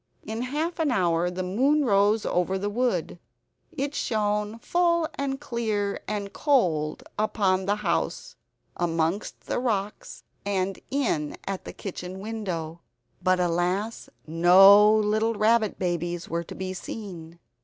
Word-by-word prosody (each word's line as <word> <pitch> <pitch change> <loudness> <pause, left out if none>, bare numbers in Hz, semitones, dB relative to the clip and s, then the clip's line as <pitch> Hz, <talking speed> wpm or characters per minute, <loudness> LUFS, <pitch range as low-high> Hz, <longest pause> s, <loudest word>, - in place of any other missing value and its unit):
In 220 +2 -4
half 305 +7 -2
an 315 -2 +2
hour 175 -6 +1
the 180 +1 -4
moon 270 +11 +2
rose 205 0 +3
over 180 +2 0
the 205 +2 -2
wood. 205 -8 -1 0.6
It 280 +2 -2
shone 210 -3 -1
full 340 +5 +1
and 270 -1 -3
clear 220 -7 -2
and 205 -1 -4
cold, 170 - +1 0.2
upon 195 -3 +1
the 205 - +2
house, 170 0 -1 0.4
amongst 165 +3 -1
the - - -2
rocks, 210 -5 -3 0.2
and 195 -1 -1
in 220 - -1
at 195 -1 -4
the - - -7
kitchen 185 -1 -7
window. 185 -7 -5 0.4
But 185 0 +2
alas, 180 +5 -1 0.2
no 190 +6 +7
little 215 +1 +2
rabbit 215 0 +2
babies 175 -1 -2
were 170 +1 -3
to - - -9
be 185 0 -4
seen! 175 -4 -8
200 Hz, 135 wpm, -26 LUFS, 180-225 Hz, 0.6 s, no